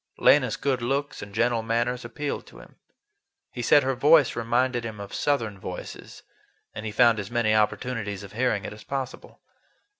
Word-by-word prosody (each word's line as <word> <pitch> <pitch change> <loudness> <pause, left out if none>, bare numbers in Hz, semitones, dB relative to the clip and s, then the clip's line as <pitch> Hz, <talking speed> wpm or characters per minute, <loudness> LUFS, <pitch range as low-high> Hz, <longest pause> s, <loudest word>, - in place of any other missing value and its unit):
Lena's - - +4
good 130 -3 -1
looks 140 +4 -2
and 100 - -8
gentle 115 +2 +1
manners 120 +2 -1
appealed 140 +5 -5
to - - -15
him. - - -15 0.7
He 125 - -5
said 145 +4 +5
her 135 +1 0
voice 145 +1 +4
reminded 120 +1 0
him 110 -2 -6
of 100 -1 -8
Southern 115 -9 -1
voices, 90 -1 -8 0.5
and 110 0 -6
he - - -4
found 115 0 +4
as 100 0 -5
many 120 -3 +1
opportunities 105 -1 -1
of 100 0 -11
hearing 115 -3 0
it - - -6
as 105 - -13
possible. 135 -2 -6
120 Hz, 175 wpm, -26 LUFS, 110-130 Hz, 0.7 s, said